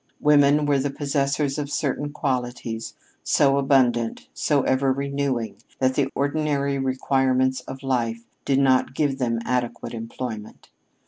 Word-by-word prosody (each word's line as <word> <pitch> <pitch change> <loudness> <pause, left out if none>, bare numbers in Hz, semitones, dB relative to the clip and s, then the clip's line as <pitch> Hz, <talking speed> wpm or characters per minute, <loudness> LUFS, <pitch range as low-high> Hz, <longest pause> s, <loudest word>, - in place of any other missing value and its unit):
Women 150 0 +4
were 145 -1 +2
the 140 +2 -1
possessors 140 0 -1
of 145 -1 -3
certain 145 0 -2
qualities 125 -5 -3 0.3
so 140 -1 +3
abundant, 125 -4 +1
so 145 -3 +1
ever 130 +1 +2
renewing, 140 -4 -2 0.2
that 130 0 +2
the 135 0 +1
ordinary 140 -1 0
requirements 130 -1 +1
of 130 +1 -8
life 115 -3 -1 0.2
did 135 - +1
not 130 -1 +3
give 140 -2 0
them 115 -2 0
adequate 125 -1 -2
employment. 115 -1 -7
135 Hz, 130 wpm, -24 LUFS, 125-140 Hz, 0.3 s, Women